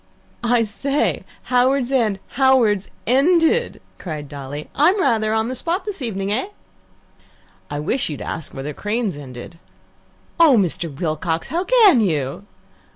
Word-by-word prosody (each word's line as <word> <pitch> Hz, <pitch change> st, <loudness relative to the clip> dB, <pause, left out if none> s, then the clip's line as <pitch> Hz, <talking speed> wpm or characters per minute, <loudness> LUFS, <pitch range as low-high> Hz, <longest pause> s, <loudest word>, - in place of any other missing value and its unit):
"I 240 Hz, 0 st, +3 dB
say! 275 Hz, +7 st, -1 dB, 0.2 s
Howards 255 Hz, +1 st, +2 dB
End 225 Hz, -7 st, +1 dB
Howard's 245 Hz, -7 st, +3 dB, 0.2 s
Ended!" 330 Hz, -, +2 dB, 0.2 s
cried 155 Hz, -5 st, -6 dB
Dolly. 145 Hz, +1 st, -7 dB
"I'm 355 Hz, +8 st, +3 dB
rather 220 Hz, -10 st, +2 dB
on 220 Hz, 0 st, +1 dB
the 255 Hz, -, -3 dB
spot 335 Hz, -, -2 dB
this 405 Hz, -7 st, -5 dB
evening, 200 Hz, -5 st, -3 dB
eh?" 250 Hz, -, -1 dB, 1.2 s
"I 145 Hz, -, -4 dB
wish 245 Hz, -, -1 dB
you'd 150 Hz, -, -5 dB
ask 160 Hz, -, -6 dB
whether 140 Hz, +2 st, -6 dB
Crane's 210 Hz, -1 st, -2 dB
ended." 140 Hz, +3 st, -10 dB, 0.8 s
"Oh, 310 Hz, -7 st, +7 dB
Mr. 175 Hz, -4 st, 0 dB
Wilcox, 160 Hz, 0 st, -2 dB
how 345 Hz, +4 st, -1 dB
CAN 425 Hz, -, +6 dB
you?" 155 Hz, -1 st, -2 dB
220 Hz, 135 wpm, -20 LUFS, 165-275 Hz, 1.2 s, Oh